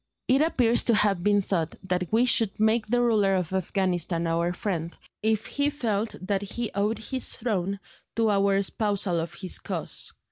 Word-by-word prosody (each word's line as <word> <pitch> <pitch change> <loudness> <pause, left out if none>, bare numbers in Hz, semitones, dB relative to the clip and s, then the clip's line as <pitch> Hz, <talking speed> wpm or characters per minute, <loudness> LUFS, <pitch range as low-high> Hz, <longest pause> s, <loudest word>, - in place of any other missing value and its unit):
It 265 +3 +4
appears 245 -7 +2
to 235 - +4
have 200 -4 +2
been 205 +1 +2
thought 170 -4 -2
that 180 -1 -1
we 230 +3 +3
should 225 -5 +2
make 220 +1 +2
the 245 +2 +2
ruler 210 -5 +3
of 180 -1 -2
Afghanistan 180 -2 -1
our 170 +1 0
friend, 175 -3 -3 0.3
if 220 0 +1
he 285 +1 0
felt 225 -7 -2
that 195 +1 -1
he 215 +3 -4
owed 205 +3 0
his 260 +3 -1
throne 200 -4 -2 0.4
to 225 -2 +2
our 200 0 +2
espousal 200 -2 +1
of 165 +1 -5
his 185 0 0
cause. - - -1
200 Hz, 175 wpm, -26 LUFS, 185-225 Hz, 0.4 s, It